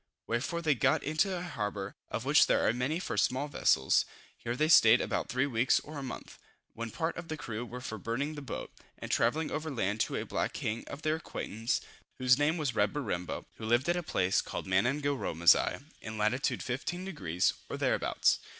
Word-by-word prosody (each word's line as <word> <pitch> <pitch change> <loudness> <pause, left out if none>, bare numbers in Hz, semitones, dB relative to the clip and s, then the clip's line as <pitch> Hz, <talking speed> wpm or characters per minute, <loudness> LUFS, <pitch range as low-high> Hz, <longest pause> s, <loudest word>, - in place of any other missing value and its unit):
Wherefore 130 +9 -2
they 155 -2 +4
got 125 - +2
into 160 +6 +1
a 175 - -4
harbor, 105 - -4
of - - -4
which - - +6
there - - +3
are - - +3
many 125 +6 -1
for 180 - -4
small 130 +3 +1
vessels. 65 - +3 0.3
Here 120 +1 -4
they 155 +4 +2
stayed 120 -7 +7
about - - -2
three 130 +2 +1
weeks 125 -2 +2
or 150 -1 -8
a - - -5
month, 130 -3 -8 0.3
when 115 0 -5
part 160 +7 -2
of 175 -1 -6
the 155 - -4
crew 115 -5 -5
were 125 +1 -7
for 110 -3 -5
burning 130 +9 -2
the 150 - -7
boat, 140 - -6 0.2
and - - -6
travelling 160 0 +1
over 155 +1 -3
land 110 -6 -1
to - - 0
a - - -2
black - - -2
king 110 +2 -3
of 140 +2 -8
their 155 0 +1
acquaintance, 115 -7 -3 0.4
whose 130 +1 +4
name 155 +3 +2
was 145 -5 -1
Reberimbo, 105 -4 -1
who 110 - -6
lived 120 +5 +2
at 175 - +3
a 175 - -1
place 95 - +1
called - - -5
Manangaromasigh, 120 - +2 0.2
in 110 0 -6
lat. 110 +6 +1
15 145 +8 -3
deg. 90 - -4 0.3
or - - -4
thereabouts. - - +2
130 Hz, 195 wpm, -31 LUFS, 110-155 Hz, 0.4 s, stayed